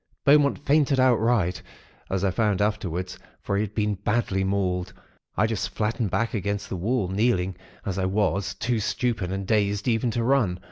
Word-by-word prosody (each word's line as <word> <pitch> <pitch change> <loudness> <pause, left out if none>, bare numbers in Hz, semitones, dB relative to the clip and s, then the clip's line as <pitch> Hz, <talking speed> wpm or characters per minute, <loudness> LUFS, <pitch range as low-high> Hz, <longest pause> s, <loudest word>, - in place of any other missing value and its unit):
Beaumont 140 0 +5
fainted 145 -1 +2
outright, 115 -7 +2 0.5
as 95 0 -1
I 95 - +2
found 105 0 +1
afterwards; 95 -4 -2 0.2
for 100 - -1
he 100 - +1
had 105 -1 -4
been 105 -1 +1
badly 100 -1 0
mauled. 95 -2 -1 0.4
I 105 - +4
just 100 -5 -2
flattened 110 +2 -1
back 115 +6 -1
against 100 -1 -2
the - - -3
wall, 105 +3 0
kneeling, 95 -2 +1 0.3
as 95 -1 -2
I 95 - +1
was, 95 0 0
too 120 -2 -1
stupid 110 -3 -1
and 95 0 -3
dazed 105 0 +1
even 115 0 +1
to 115 +1 -1
run. 115 -8 +2
105 Hz, 175 wpm, -25 LUFS, 95-115 Hz, 0.5 s, Beaumont